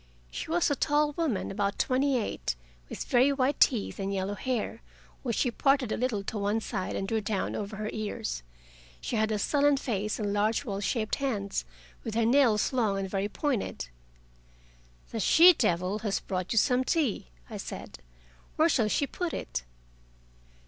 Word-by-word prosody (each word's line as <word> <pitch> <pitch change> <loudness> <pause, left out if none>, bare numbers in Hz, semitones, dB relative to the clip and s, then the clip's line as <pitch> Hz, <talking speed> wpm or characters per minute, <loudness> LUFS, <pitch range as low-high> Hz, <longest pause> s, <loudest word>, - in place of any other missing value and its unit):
She - - -5
was 335 -2 +2
a - - +2
tall 295 +2 +2
woman, 290 - -1
about 200 0 -1
twenty 265 +1 +2
eight, 65 - -2 0.3
with - - -5
very 255 +3 +4
white 275 +1 +1
teeth 225 -6 +3
and 195 0 -2
yellow 195 +1 -1
hair, 230 +1 -3 0.4
which 235 -4 -2
she 250 - +1
parted 275 -2 +2
a - - +1
little 230 -5 -1
to 210 +2 -4
one 205 +2 +1
side 190 -4 -3
and 195 - -2
drew 220 +1 0
down 205 -2 -2
over 210 +1 -4
her 215 0 -3
ears. 135 - -3 0.6
She - - -3
had 220 0 +1
a 215 - +1
sullen 285 +6 +3
face 215 -5 -2
and 205 -2 -1
large 215 +6 +1
well 200 -4 -3
shaped 215 +2 -1
hands, 205 - -2 0.4
with 220 - -4
her 230 0 +3
nails 235 -3 +3
long 220 -6 +1
and 195 0 -2
very 195 +1 -1
pointed. 245 - -2 1.2
"The 225 - -3
'she 340 - +8
devil' 180 - 0
has 205 -2 -1
brought 185 -1 -4
you 225 - 0
some 250 +4 +4
tea," 275 - 0 0.2
I - - -7
said. - - -7 0.6
"Where 320 +2 +4
shall 235 -8 +2
she 285 - +1
put 350 +4 -4
it?" - - -4
220 Hz, 175 wpm, -29 LUFS, 200-270 Hz, 1.2 s, she